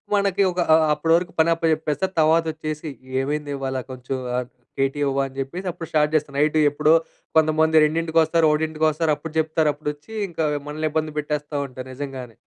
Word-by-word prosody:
మనకి 200 -1 +2
ఒక 180 - -5 0.2
ఆహ్, 160 0 +4
అప్పటి 165 +2 +1
వరకు 175 0 -4
పని 165 +1 +3
అప్పచెప్పేస్తారు. 160 +2 0
తర్వాత 160 +1 +4
వచ్చేసి 155 0 -5 0.3
ఏమైందివాళ 140 -2 -3
కొంచెం 130 +1 -5 0.2
ఆ - - +2 0.4
కేటీ 135 +2 0
ఇవ్వా! 135 0 +1
అని 135 0 -14
చెప్పేసి 175 +8 -5
అప్పుడు 165 - -8
స్టార్ట్ 150 0 +2
చేస్తా 150 -2 0
నైట్ 150 +2 +2
ఎప్పుడో 150 +2 +3 0.4
కొంతమంది 155 0 +4
రెండింటికొస్తారు, 165 +1 +2
ఒకటింటికొస్తారు 155 0 +1
అప్పుడు 155 +1 -8
చెప్తారు 160 -1 +2
అప్పుడొచ్చి 150 +7 -6 0.2
ఇంకా 160 -2 -2 0.2
మనల్ని 155 +1 -2
ఇబ్బంది 155 0 -1
పెట్టేస్తా 150 0 -3
ఉంటారు 130 0 -9
నిజంగానే. 130 -4 -7
155 Hz, 160 wpm, -23 LUFS, 145-160 Hz, 0.4 s, ఆహ్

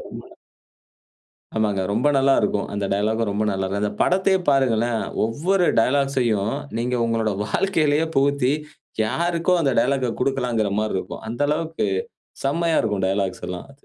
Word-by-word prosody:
செம. - - -9 1.4
ஆமாங்க. 105 -3 +1
ரொம்ப 120 +7 +1
நல்லா 135 0 +4
இருக்கும். 100 - -1
அந்த 100 -1 -2
டயலாக்கும் 110 +2 0
ரொம்ப 105 +2 -1
நல்லா 95 0 -2
இருக்கும். 100 +2 -2
அந்த 105 - -1
படத்தையே 190 +1 +2
பாருங்களேன். 120 -4 +2 0.2
ஒவ்வொரு 175 - +1
டயலாக்ஸையும் 125 -5 +1 0.3
நீங்க 125 +2 -1
உங்களுடைய 110 -3 0
வாழ்க்கையிலேயே 155 - +1
புகுத்தி, 140 -1 +2 0.5
யாருக்கோ 170 +9 0
அந்த 135 - +2
டயலாக்க 130 -1 0
குடுக்கலாம்கிற 125 -5 0
மாரி 110 0 -2
இருக்கும். - - -7
அந்த 120 +3 -6
அளவுக்கு 160 -3 -1 0.6
செம்மையா 165 +3 +1
இருக்கும் 105 -4 0
டயலாக்ஸ் 95 -1 -2
எல்லாம். 90 +8 -7
120 Hz, 135 wpm, -22 LUFS, 105-145 Hz, 1.4 s, நல்லா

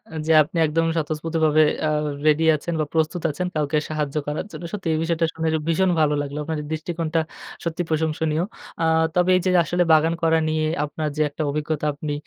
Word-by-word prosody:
এ - - -3
যে 160 - +4
আপনি 165 +3 -7
একদমই 165 +2 +1
স্বতঃস্ফূর্তভাবে 155 0 +1 0.2
আ - - +1 0.4
রেডি 155 +1 +4
আছেন 170 +3 -5
বা - - 0
প্রস্তুত 160 +2 0
আছেন 180 +5 -3
কাউকে 150 0 0
সাহায্য 150 -2 -3
করার 150 +5 -2
জন্য। - - -8
সত্যি 195 -4 -4
এই - - +1
বিষয়টা 165 0 +1
শুনে 160 0 -2 0.2
ভীষণ 180 +3 +2
ভালো 150 -1 +3
লাগলো। 145 +1 -5
আপনার 160 0 -3
দৃষ্টিকোণটা 165 0 -1 0.4
সত্যি 170 +1 -2
প্রশংসনীয়। 160 0 0 0.4
আ - - +3 0.3
তবে 180 +1 +3
এই - - 0
যে - - +3 0.2
আসলে 175 0 +1
বাগান 160 +1 +4
করা 160 0 +4
নিয়ে 155 0 0 0.2
আপনার 150 +1 -3
যে - - +1
একটা 155 +2 -4
অভিজ্ঞতা, 150 0 -2
আপনি 145 +1 -4
160 Hz, 190 wpm, -23 LUFS, 155-165 Hz, 0.4 s, যে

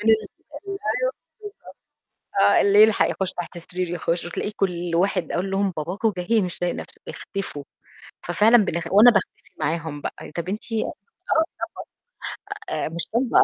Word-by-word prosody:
أيوه 220 -1 +4 0.4
بالضبط. 395 0 -4 1.6
آه، - - +6
اللي 200 +1 +6
يلحق 220 -1 +4
يخُش 190 -1 -2
تحت 175 0 -6
سرير 180 +1 -4
يخٌش 170 0 -1
وتلاقي 175 +4 -3
كل 175 -4 -1
واحد 185 +1 +1
أقول 190 +2 -1
لهم: 195 -1 +1
"باباكم 190 +7 -1
جاي 210 +5 +2
مش 180 -2 -4
طايق 175 0 0
نَفْسه، - - -9
اختفوا." 195 -8 -6 0.6
ففعلًا 210 +7 +6
بنخ 170 -1 -2
وأنا 215 +5 +9
باختفي 205 -4 -2
معاهم 160 -3 -2
بقى، - - -6
طَب 170 +1 -3
أنتِ 215 +3 -5
آه 220 - 0 1.6
طبعًا. 420 +2 -3
آآ - - -2
مش 170 +1 -4
هُم 245 0 +2
190 Hz, 145 wpm, -24 LUFS, 170-215 Hz, 1.6 s, وأنا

